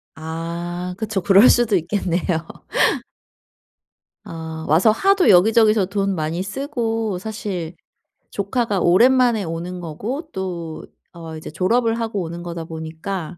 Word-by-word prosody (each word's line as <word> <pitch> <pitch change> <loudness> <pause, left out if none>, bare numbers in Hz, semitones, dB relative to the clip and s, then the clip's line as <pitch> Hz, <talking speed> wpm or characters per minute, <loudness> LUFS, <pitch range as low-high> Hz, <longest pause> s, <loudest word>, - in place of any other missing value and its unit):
아. 170 +3 -5
그쵸. 215 -3 -2
그럴 195 +6 +6
수도 235 -4 +3
있겠네요. 175 0 0 2.1
어 160 -1 -7
와서 170 +9 +5
하도 390 - +3
여기저기서 215 +2 +5
돈 195 0 -1
많이 165 +2 -2
쓰고 225 -3 -2
사실 190 -5 -5 0.6
조카가 205 0 -1
오랜만에 235 +5 +4
오는 170 +2 -5
거고 220 - -5
또 175 -4 -5 0.3
어 165 -2 -8
이제 155 - -8
졸업을 225 +7 +1
하고 220 -3 -2
오는 170 0 -6
거다 170 -1 -5
보니까 160 +2 -6
185 Hz, 245 characters per minute, -21 LUFS, 165-220 Hz, 2.1 s, 그럴